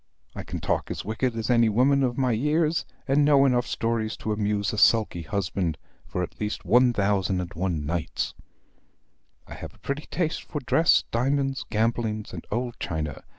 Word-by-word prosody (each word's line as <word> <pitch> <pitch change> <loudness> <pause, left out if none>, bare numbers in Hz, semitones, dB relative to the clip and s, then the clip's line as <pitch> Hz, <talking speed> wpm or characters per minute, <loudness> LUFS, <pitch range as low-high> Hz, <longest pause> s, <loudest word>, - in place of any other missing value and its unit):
I - - -4
can - - -6
talk - - -1
as - - -5
wicked 115 +3 -1
as 115 +2 -1
any 115 -2 +4
woman 130 +6 +3
of 125 -2 0
my 130 -2 +2
years, 150 +7 +1 0.2
and 140 +2 +4
know 140 -1 +5
enough 125 -2 +2
stories 115 -1 -1
to 110 - -3
amuse 105 0 0
a 105 - -1
sulky 110 -6 +4
husband 90 -2 -2 0.3
for 90 - -2
at 90 - -8
least 105 -2 -3
one 125 +7 +5
thousand 100 -3 +1
and 90 -1 -5
one 85 -4 -2
nights. 80 +1 -2 1.1
I - - -10
have - - -9
a - - -21
pretty 140 +2 -4
taste 160 0 -1
for 150 - -5
dress, 160 +6 +4
diamonds, 135 +3 0
gambling, 110 -1 0
and - - -8
old 120 +2 -3
China. 75 -4 -3
115 Hz, 180 wpm, -26 LUFS, 100-135 Hz, 1.1 s, know